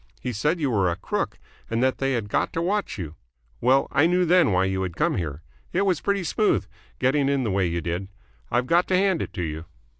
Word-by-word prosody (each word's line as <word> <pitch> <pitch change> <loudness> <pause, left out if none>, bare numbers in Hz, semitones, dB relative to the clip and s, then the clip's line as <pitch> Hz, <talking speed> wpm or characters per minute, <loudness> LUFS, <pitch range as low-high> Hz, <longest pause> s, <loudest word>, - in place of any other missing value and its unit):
He 125 - -4
said 150 - 0
you 140 -5 0
were 100 -5 +2
a 85 - -1
crook 95 - -3 0.3
and 115 +2 0
that 130 0 +1
they 135 0 +1
had 115 -4 -2
got - - 0
to - - -1
watch 200 - -1
you. 80 -6 -5 0.5
Well, 130 +3 +3
I 150 +3 +4
knew 180 +1 +2
then 175 -7 +4
why 95 0 +3
you 95 0 -1
had 90 -3 -3
come - - +1
here. 80 -3 -4 0.3
It 185 - +2
was 185 -5 +1
pretty 200 -2 0
smooth, 210 - +1 0.3
getting 135 +2 +2
in 140 -2 +1
the 110 - -1
way 95 -1 +1
you 85 0 -2
did. 85 +3 -3 0.4
I've 120 +1 +1
got 170 +6 +3
to 185 - +3
hand 190 -2 +2
it - - -4
to 90 - -3
you." 80 0 -4
125 Hz, 240 wpm, -25 LUFS, -, 0.5 s, I